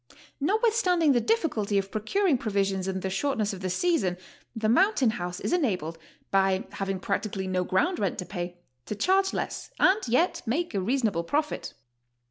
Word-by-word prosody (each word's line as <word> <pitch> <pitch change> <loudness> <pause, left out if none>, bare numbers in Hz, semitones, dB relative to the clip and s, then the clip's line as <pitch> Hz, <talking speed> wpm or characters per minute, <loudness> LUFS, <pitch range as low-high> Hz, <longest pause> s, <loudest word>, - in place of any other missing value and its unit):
Notwithstanding 370 - +3
the 245 -3 +3
difficulty 230 - 0
of 195 0 -1
procuring 285 - +1
provisions 195 -3 0
and 190 -1 -3
the 190 - -1
shortness 215 -1 0
of 190 - -7
the 185 - -2
season, 190 - +1 0.4
the 220 -1 -1
mountain 275 - +4
house 180 -2 -4
is - - -2
enabled, 185 - 0 0.3
by 195 -1 +3
having 195 -1 -3
practically 200 0 -2
no 185 -1 0
ground 325 - +1
rent 195 -4 -1
to 180 - -4
pay, 175 -2 -5 0.3
to 210 - -3
charge 380 - +2
less - - -4
and 380 +3 +5
yet 255 +10 +2
make 320 +8 -1
a 195 - 0
reasonable 215 -5 0
profit. 300 - -2
215 Hz, 165 wpm, -27 LUFS, -, 0.4 s, and